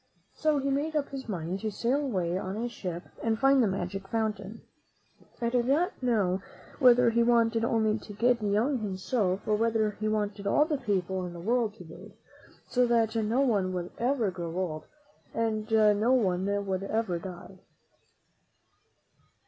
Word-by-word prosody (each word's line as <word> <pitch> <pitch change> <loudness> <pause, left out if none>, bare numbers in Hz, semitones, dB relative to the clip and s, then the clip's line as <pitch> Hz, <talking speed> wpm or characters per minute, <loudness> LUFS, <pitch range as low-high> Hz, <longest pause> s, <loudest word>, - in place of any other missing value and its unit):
So 310 -2 +1
he 275 0 0
made 300 +3 -1
up 290 -2 0
his 265 -3 -7
mind 180 -1 -3
to 215 - -2
sail 245 +7 0
away 185 -10 -1
on 190 +1 -3
a 235 +2 -2
ship 180 -7 -6 0.2
and 225 -1 0
find 270 +2 +4
the 230 - +3
magic 195 0 -3
fountain. 215 -1 -3 0.8
I 235 - 0
do 245 0 +2
not 290 +10 0
know 200 -7 +1 0.4
whether 245 -2 +6
he 235 +1 +2
wanted 230 -1 +3
only 220 -1 +1
to. 210 - -10
get 235 +3 +2
young 215 +6 +1
himself, 195 -1 -1
or 215 - +3
whether 220 -1 +1
he 215 - -1
wanted 205 -1 -2
all 295 +8 +4
the 300 -3 -2
people 190 -5 -1
in 175 - -8
the 170 - -8
world 225 +2 0
to 210 - -11
bathe, 160 -1 -12 0.5
so 250 -1 +2
that 230 -1 +2
no 225 +4 +1
one 200 -8 +1
would 180 -1 -4
ever 240 -4 +1
grow 170 -2 -6
old 165 -5 -3 0.5
and 220 -1 -1
no 215 +2 +4
one 190 -6 +1 0.2
would 190 -1 -2
ever 195 -3 -1
die. 180 +1 -9
220 Hz, 170 wpm, -28 LUFS, 190-240 Hz, 0.8 s, whether